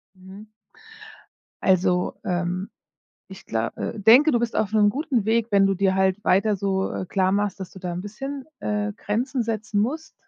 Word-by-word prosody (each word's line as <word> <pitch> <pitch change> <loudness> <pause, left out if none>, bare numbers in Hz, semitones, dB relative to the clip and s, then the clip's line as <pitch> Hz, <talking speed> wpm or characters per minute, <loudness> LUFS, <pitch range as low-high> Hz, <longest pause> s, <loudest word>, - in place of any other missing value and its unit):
Mhm. 190 +3 -13 1.2
Also, 180 -1 +2
ähm, 180 +1 -2 0.6
ich 190 0 -12
glau 110 0 -1
äh, 220 - -4
denke, 245 +9 +6
du 240 - +2
bist 235 0 -2
auf 215 -1 0
'nem 210 -1 +4
guten 265 -4 -1
Weg, 230 +1 +1
wenn 200 -1 +4
du 195 - +1
dir 190 0 +1
halt 190 +1 +1
weiter 200 +2 +3
so, 190 0 -1
äh, 185 - -4
klar 190 0 +1
machst, 205 -1 0
dass 190 - -7
du - - -12
da 180 - -4
'n 175 - -4
bisschen, 270 +8 -6 0.2
äh, 210 0 -2
Grenzen 245 +5 -2
setzen 220 -2 -2
musst, 315 +8 -3
205 Hz, 180 wpm, -24 LUFS, 190-225 Hz, 1.2 s, denke